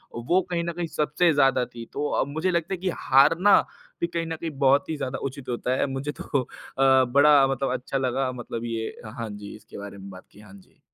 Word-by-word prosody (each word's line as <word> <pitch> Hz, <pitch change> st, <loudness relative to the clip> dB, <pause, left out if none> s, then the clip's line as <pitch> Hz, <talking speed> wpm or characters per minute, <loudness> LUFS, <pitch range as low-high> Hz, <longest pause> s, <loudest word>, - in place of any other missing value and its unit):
वो 145 Hz, +11 st, +1 dB
कहीं 170 Hz, -1 st, 0 dB
न 170 Hz, -, -2 dB
कहीं 175 Hz, -, -2 dB
सबसे 155 Hz, +3 st, +2 dB
ज़्यादा 135 Hz, -3 st, +3 dB
थी। 120 Hz, -1 st, -10 dB
तो 145 Hz, +1 st, -1 dB
अ, -, -, +1 dB
मुझे 160 Hz, +6 st, -1 dB
लगता 170 Hz, +2 st, -1 dB
है -, -, -2 dB
कि 185 Hz, +1 st, -2 dB, 0.2 s
हारना 165 Hz, +9 st, +6 dB, 0.4 s
भी 170 Hz, -, +1 dB
कहीं 170 Hz, -1 st, -3 dB
न 165 Hz, -, -3 dB
कहीं 165 Hz, 0 st, -5 dB
बहुत 140 Hz, +3 st, +4 dB
ही 160 Hz, -, -1 dB
ज़्यादा 130 Hz, -1 st, -3 dB
उचित 130 Hz, -2 st, -11 dB
होता 125 Hz, +1 st, -1 dB
है। -, -, +2 dB
मुझे 140 Hz, +2 st, -3 dB
तो 140 Hz, -3 st, 0 dB
अ, -, -, -9 dB, 0.6 s
बड़ा 140 Hz, +4 st, +5 dB
मतलब 135 Hz, -1 st, -1 dB
अच्छा 130 Hz, +1 st, -3 dB
लगा, 130 Hz, 0 st, 0 dB
मतलब 120 Hz, -1 st, -6 dB
ये 115 Hz, -1 st, -3 dB, 0.2 s
अ, -, -, -7 dB
हाँ 115 Hz, -1 st, -4 dB
जी, 105 Hz, -1 st, -8 dB
इसके 110 Hz, -, -13 dB
बारे 100 Hz, 0 st, -8 dB
में 100 Hz, 0 st, -10 dB
बात 95 Hz, -1 st, -12 dB
की, -, -, -18 dB
हाँ 105 Hz, -2 st, -15 dB
जी। 95 Hz, -2 st, -19 dB
135 Hz, 235 wpm, -25 LUFS, 120-160 Hz, 0.6 s, हारना